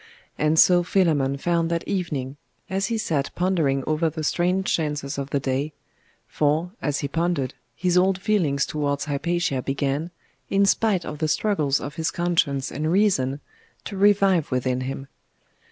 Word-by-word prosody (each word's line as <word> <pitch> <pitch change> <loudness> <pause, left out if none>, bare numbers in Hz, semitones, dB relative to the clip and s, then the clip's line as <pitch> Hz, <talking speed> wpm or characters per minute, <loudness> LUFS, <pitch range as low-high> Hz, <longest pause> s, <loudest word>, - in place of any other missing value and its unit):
And 155 +1 +1
so 175 +2 +6
Philammon 155 -7 +1
found 170 +2 0
that 170 0 -2
evening, 145 -8 -3 0.3
as 195 +1 0
he 230 0 -1
sat 150 -10 -1
pondering 160 -7 +1
over 155 +1 +1
the 155 0 -6
strange 180 +4 +1
chances 150 -3 -2
of 140 0 -4
the 140 - 0
day; 135 +3 -2 0.5
for, 155 +4 0
as 145 -2 -1
he 140 - -1
pondered, 165 -3 -1 0.2
his 180 +1 +2
old 185 0 +2
feelings 175 -9 +1
towards 140 -2 -2
Hypatia 150 -1 -1
began, 140 +4 -2 0.4
in 200 0 +3
spite 200 -3 +2
of 150 - -6
the 155 - 0
struggles 155 -4 +1
of 145 +3 -7
his 160 0 0
conscience 160 -6 0
and 155 +3 -2
reason, 150 -9 +2 0.4
to 200 - -6
revive 195 -4 +3
within 125 0 0
him. 135 +1 -5
155 Hz, 155 wpm, -24 LUFS, 140-180 Hz, 0.5 s, so